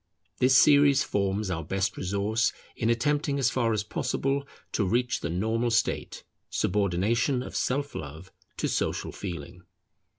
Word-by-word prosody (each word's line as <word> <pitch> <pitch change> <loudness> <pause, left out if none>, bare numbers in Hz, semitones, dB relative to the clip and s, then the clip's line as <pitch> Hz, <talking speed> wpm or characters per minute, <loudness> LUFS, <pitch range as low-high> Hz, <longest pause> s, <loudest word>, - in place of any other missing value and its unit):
This 130 0 +5
series 140 -1 +6
forms 100 0 -1
our 80 -2 -2
best 95 +4 -1
resource 100 +4 0 0.2
in 115 - 0
attempting 145 +4 +1
as 130 -2 +2
far 120 -3 +1
as 105 -1 0
possible 140 +6 -1 0.2
to 105 - 0
reach 120 +6 +1
the 85 - -4
normal 110 +7 0
state; 110 - -1 0.3
subordination 105 +7 +1
of - - -9
self 140 +2 -1
love 80 +6 -8 0.3
to - - 0
social - - -1
feeling. 85 -2 -7
110 Hz, 140 wpm, -27 LUFS, 95-130 Hz, 0.3 s, series